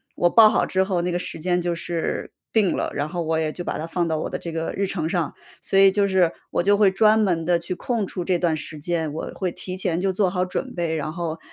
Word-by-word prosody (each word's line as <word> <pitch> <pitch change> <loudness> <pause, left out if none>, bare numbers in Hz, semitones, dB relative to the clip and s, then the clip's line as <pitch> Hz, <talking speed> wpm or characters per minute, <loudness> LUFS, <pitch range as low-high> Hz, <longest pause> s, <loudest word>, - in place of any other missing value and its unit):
我 175 - +3
报 220 +3 +7
好 - - +2
之 190 0 +1
后 190 -2 0
那 180 +1 -1
个 175 - 0
时 165 - -4
间 180 +2 0
就 175 0 -1
是 170 0 -3 0.2
定 210 -5 +3
了， - - -2
然 145 +1 -2
后 175 +1 -3
我 160 0 0
也 155 -1 -1
就 175 - -6
把 - - -3
它 155 - -3
放 170 0 -1
到 160 -1 0
我 - - -3
的 - - -3
这 170 - -6
个 160 0 -3
日 200 - 0
程 165 -5 -2
上。 170 -3 -1 0.3
所 195 - 0
以 195 0 +7
就 200 +1 +2
是 185 -3 +3 0.2
我 - - +1
就 200 +2 +4
会 200 -2 +5
专 215 +2 +4
门 180 -6 +1
地 175 0 +3
去 175 +2 -4
空 225 0 -1
出 180 - -4
这 180 0 +1
段 165 -3 +1
时 155 0 -6
间， 160 -1 -2
我 160 - -5
会 185 -2 -2
提 185 +2 -6
前 175 -2 -1
就 190 0 0
做 190 0 +2
好 180 0 0
准 185 - -4
备， 170 -2 -1
然 155 0 -3
后， 165 -1 -4
175 Hz, 295 characters per minute, -23 LUFS, 165-190 Hz, 0.3 s, 报